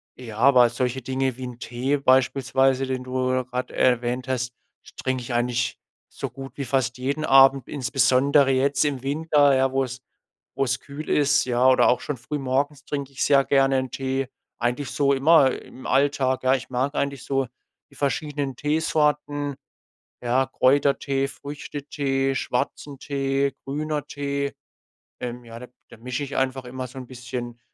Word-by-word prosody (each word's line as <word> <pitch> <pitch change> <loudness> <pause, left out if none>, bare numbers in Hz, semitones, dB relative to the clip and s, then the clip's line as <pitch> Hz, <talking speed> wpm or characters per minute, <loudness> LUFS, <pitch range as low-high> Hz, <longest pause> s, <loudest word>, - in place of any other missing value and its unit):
ja, 115 -4 -9
aber 125 0 +6
solche 125 +2 -2
Dinge 130 -1 -1
wie 130 - -7
'n 125 -1 -8
Tee 130 +4 -1
beispielsweise, 135 0 +2
den 130 -1 -3
du 130 0 0
grad 125 0 -4
erwähnt 125 0 +1
hast, 125 -1 -1 0.5
trinke 130 -1 -1
ich 120 0 -6
eigentlich 120 0 0 0.3
so - - -5
gut 135 -2 -9
wie 140 - -3
fast 130 -1 0
jeden 140 +4 -2
Abend. 135 -2 +6
Insbesondere 135 +1 +3
jetzt 135 +1 +2
im 140 -4 -1
Winter, 145 0 +3
ja, 130 0 +2
wo's 130 -1 -2 0.5
wo's 130 -2 0
kühl 145 +2 -9
ist, 145 0 +3
ja? 125 0 +2
Oder 130 - +5
auch 125 - +2
schon 145 - -4
frühmorgens 140 +2 -2
trink 140 -2 -4
ich 135 - -2
sehr 140 -1 +5
gerne 135 -1 +3
'n 130 0 -1
Tee. 135 0 -2 0.3
Eigentlich 125 +4 -1
so 140 -1 +2
immer 140 0 +5
im 130 - -9
Alltag, 135 -1 +1
ja? 130 +1 +4
Ich 130 - -6
mag 130 +3 0
eigentlich 140 -2 -2
so 135 -1 0 0.4
die - - -18
verschiedenen 140 0 -2
Teesorten, 150 -2 0 0.7
ja, 125 +2 +1
Kräutertee, 135 +1 +2
Früchtetee, 140 -2 -3
schwarzen 135 +2 -3
Tee, 140 0 -1
grüner 150 +1 -3
Tee. 140 0 -3 0.7
Ähm, 125 0 -5
ja, 115 0 -10
da 125 - -8 0.2
da - - -13
mische 125 +4 -4
ich 140 - -6
einfach 130 0 -1
immer 130 +1 -6
so 125 - -10
'n 130 - -8
bisschen, 120 -1 -6
135 Hz, 160 wpm, -24 LUFS, 125-140 Hz, 0.7 s, aber